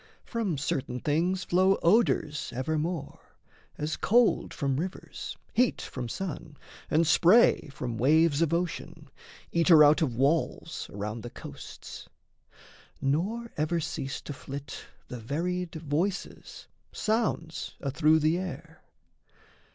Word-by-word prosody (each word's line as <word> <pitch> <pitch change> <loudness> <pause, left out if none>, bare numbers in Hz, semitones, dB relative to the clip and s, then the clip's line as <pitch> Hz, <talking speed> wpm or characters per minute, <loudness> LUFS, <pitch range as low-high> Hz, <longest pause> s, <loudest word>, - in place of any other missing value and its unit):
From 215 - -2
certain 130 -2 -2
things 175 +7 0
flow 185 +2 +3
odours 170 - +2
evermore, 155 +3 -2 0.6
As 150 +1 -2
cold 240 +2 +3
from 135 -2 -1
rivers, 185 +3 -6 0.2
heat 250 0 +2
from 125 -3 -5
sun, 160 0 -5 0.3
and 160 +2 +3
spray 175 +3 +5
From 120 -5 -5
waves 155 +3 +4
of 165 -2 +2
ocean, 170 0 -3 0.4
eater 165 -2 +6
out 150 +1 +5
of 130 -7 0
walls 140 +6 0
Around 105 +3 -5
the 120 - -7
coasts. - - -10 0.9
Nor 200 +12 -1
ever 155 +3 0
cease 145 -3 -4
to 145 - -7
flit 140 0 -8 0.2
The 125 - -7
varied 170 +9 -3
voices, 160 +5 -3 0.3
sounds 215 -7 -1
athrough 155 +3 +3
the 160 +3 +2
air. 165 -3 -7
160 Hz, 115 wpm, -28 LUFS, 140-180 Hz, 0.9 s, eater